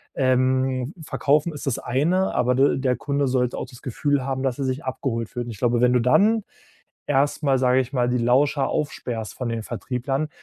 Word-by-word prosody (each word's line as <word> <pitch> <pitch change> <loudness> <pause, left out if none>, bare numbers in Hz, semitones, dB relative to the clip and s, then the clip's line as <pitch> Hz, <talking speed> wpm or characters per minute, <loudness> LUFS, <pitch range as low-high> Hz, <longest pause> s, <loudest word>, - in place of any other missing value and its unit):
Ähm, 130 +1 +1
Verkaufen 150 +3 +1
ist 145 - -8
das 130 - 0
eine, 170 +10 +1
aber 125 0 +2
de 135 +1 +3
der 130 -1 +1
Kunde 140 0 -1
sollte 125 -1 0
auch - - -4
das 125 - -14
Gefühl 140 +1 -1
haben, 135 -1 -2
dass 130 -3 -1
er 135 - -1
sich 130 +1 -2
abgeholt 115 -3 -3
fühlt.“ 120 -1 -4
Und 120 - -6
ich 110 - -9
glaube, 120 -1 +1
wenn 125 0 +4
du 125 - +4
dann 210 - +3 0.6
erstmal, 140 0 +2
sage 130 0 +3
ich 130 +1 -4
mal, 125 -2 +2
die 125 - +1
Lauscher 135 +3 +2
aufsperrst 120 -6 -3
von 125 - -4
den 115 -1 -3
Vertrieblern, 130 +5 -3
130 Hz, 200 wpm, -23 LUFS, 125-140 Hz, 0.6 s, wenn